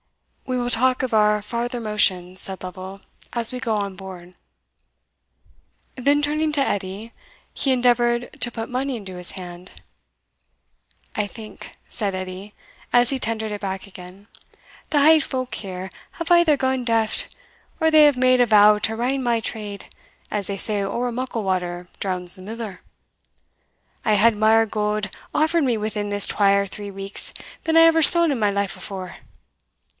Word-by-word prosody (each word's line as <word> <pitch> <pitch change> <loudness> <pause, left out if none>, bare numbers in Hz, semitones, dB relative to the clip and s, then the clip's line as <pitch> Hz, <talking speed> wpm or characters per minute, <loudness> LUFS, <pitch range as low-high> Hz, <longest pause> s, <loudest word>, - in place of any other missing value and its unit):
"We 255 -1 -1
will 245 0 -2
talk 255 +2 +2
of 255 -2 -3
our 210 -1 +3
farther 240 +3 -4
motions," 185 -4 +1
said 190 -1 -1
Lovel, 185 +2 -8 0.3
"as 235 0 +1
we 250 - -4
go 230 -4 -1
on 200 -2 -3
board." 185 -2 -11 1.6
Then 285 +3 +1
turning 305 +1 0
to 295 - +1
Edie, 205 -1 -3 0.4
he 275 - 0
endeavoured 240 -1 +1
to 240 - +3
put 225 -1 -5
money 260 +1 -3
into 195 -4 -9
his 180 -1 -3
hand. 180 -1 -10 1.4
"I 210 - 0
think," 215 +1 -11
said 205 -5 -2
Edie, 185 +2 -7 0.4
as 245 +1 +4
he 270 - -2
tendered 220 -2 -2
it 205 - -6
back 190 0 -5
again, 185 +1 -13 0.6
"the 295 - +2
hale 310 +2 +6
folk 255 -2 -4
here 190 -2 -6 0.2
have 335 +1 -5
either 345 -4 +5
gane 260 -1 -1
daft, 225 -2 0 0.5
or 320 -1 +3
they 310 -1 +7
hae 255 - -8
made 255 0 +4
a 245 - +3
vow 210 -1 +6
to 220 +1 0
rain 255 +4 -1
my 235 -2 +1
trade, 210 -3 -6 0.4
as 205 -2 -3
they 200 - -4
say 205 +1 +4
ower 235 +5 -2
muckle 240 -2 -4
water 180 -2 -3
drowns 180 -2 0
the 185 - -13
miller. 215 -1 -8 1.2
I 215 - +2
hae 205 - +2
had 230 0 +4
mair 220 +1 +4
gowd 210 -1 -2 0.2
offered 320 +1 +1
me 245 -4 +1
within 210 -1 -3
this 205 0 +5
twa 200 -1 +2
or 200 - 0
three 200 +1 -8
weeks 195 0 -3 0.3
than 325 0 +1
I - - +8
ever 325 0 +5
saw 340 +3 +9
in 290 -5 0
my 210 -2 +1
life 200 -1 -2
afore. 185 -3 -8
215 Hz, 170 wpm, -22 LUFS, 195-250 Hz, 1.6 s, saw